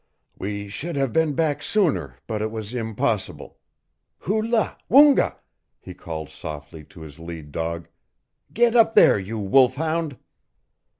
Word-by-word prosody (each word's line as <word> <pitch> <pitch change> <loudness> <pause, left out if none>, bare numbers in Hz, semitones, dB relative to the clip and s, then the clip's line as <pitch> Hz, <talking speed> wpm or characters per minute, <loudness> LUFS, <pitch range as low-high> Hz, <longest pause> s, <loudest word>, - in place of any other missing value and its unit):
"We 100 +1 -4
should 150 +12 -5
have 135 -3 -1
been 160 -2 +2
back 155 -2 0
sooner, 150 - 0
but 110 -2 -3
it 110 - -1
was 110 0 -6
impossible. 110 -3 -3 0.6
Hoo 215 +5 0
la, 225 0 0
Woonga!" 285 +2 +6 0.4
he - - -10
called 80 -2 -7
softly 75 +1 -8
to 95 -1 -15
his 80 -1 -11
lead 80 -3 -9
dog. 85 +1 -4 0.6
"Get 240 +1 +2
up 225 -1 +5
there, - - +6
you 100 +4 -5
wolf 125 +5 +3
hound!" 160 -2 -2
110 Hz, 140 wpm, -23 LUFS, -, 0.6 s, Woonga